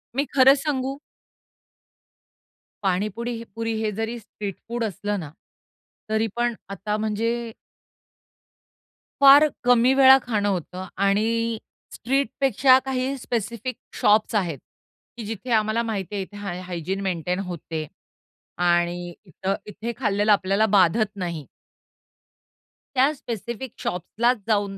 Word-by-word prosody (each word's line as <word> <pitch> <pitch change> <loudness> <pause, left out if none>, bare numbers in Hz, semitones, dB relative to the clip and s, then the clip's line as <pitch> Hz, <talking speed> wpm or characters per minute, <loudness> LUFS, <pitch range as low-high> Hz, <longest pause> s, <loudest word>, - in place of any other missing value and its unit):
मी 280 +2 +1
खरं 270 0 +7
सांगू? 275 -2 -2 1.9
पाणीपुडी 210 +5 -1
ही 230 - -7
पुरी 225 0 -2
हे 215 -1 0
जरी 225 +2 -2
स्ट्रीट 205 -3 -7
फूड 235 0 -2
असलं 205 0 -2
ना. 155 -4 -7 0.8
तरी 220 +1 +1
पण 240 0 +1 0.2
आता 200 +2 -3
म्हणजे 225 +2 -1 1.7
फार 280 +2 +9 0.2
कमी 245 +1 +5
वेळा 265 0 +8
खाणं 210 -4 0
होतं 185 0 -4 0.2
आणि 225 +3 +1 0.4
स्ट्रीटपेक्षा 270 0 +3
काही 265 +1 -1
स्पेसिफिक 235 0 -3 0.3
शॉप्स 215 +2 +3
आहेत 175 -8 0 0.6
की 230 - -6
जिथे 225 +3 -6
आम्हाला 220 +1 +2
माहितीये 205 -3 -3
इथे 205 +2 -9
हाय 195 -3 -5
हायजीन 185 +1 -4
मेंटेन 180 -1 -2
होते 160 -2 -5 0.7
आणि 175 0 +1
इथ 185 +1 -10 0.2
इथे 215 +3 -5
खाल्लेलं 205 -3 +2
आपल्याला 195 +1 +3
बाधत 195 +4 +4
नाही 170 -6 -4 1.5
त्या 265 +3 +4
स्पेसिफिक 235 -1 -6
शॉप्सलाच 230 +8 0
जाऊन 205 -3 0
215 Hz, 115 wpm, -24 LUFS, 190-240 Hz, 1.9 s, फार